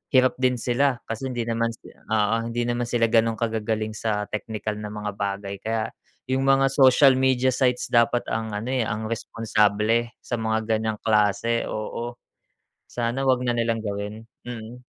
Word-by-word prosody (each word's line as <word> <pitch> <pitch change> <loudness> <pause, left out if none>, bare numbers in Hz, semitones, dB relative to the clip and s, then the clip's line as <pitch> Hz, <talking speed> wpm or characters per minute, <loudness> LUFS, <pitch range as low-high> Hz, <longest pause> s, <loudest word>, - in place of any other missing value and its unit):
hirap 130 -1 +4
din 130 -1 +3
sila 125 +2 0
kasi 115 +4 -4
hindi 120 -3 -2
naman 115 0 0
si - - -15
oo, 110 0 0
hindi 120 +1 -1
naman 120 0 -1
sila 115 -2 +1
gano'n 115 -1 +3
kagagaling 110 -1 -1
sa 105 -1 -1
teknikal 105 0 -4
na 105 - -5
mga 105 0 -4
bagay, 100 0 -3
kaya 110 0 -2 0.4
yung 135 +1 +1
mga 135 0 +5
social 135 0 +6
media 130 -1 +3
sites 125 -2 +1
dapat 120 0 +3
ang 110 0 -2
ano 110 +4 -4
eh, 130 -3 +1
ang 110 0 -3
responsable 115 0 +1
sa 120 - -2
mga 110 0 0
ganyang 110 -1 -2
klase 110 +2 +2
oo, 115 +2 -4 0.7
sana 120 +2 -2
huwag 130 -1 +2
na 120 - +1
nilang 115 -1 0
gawin, 105 +2 -4 0.2
mm. 120 +1 -7
115 Hz, 165 wpm, -24 LUFS, 110-120 Hz, 0.7 s, social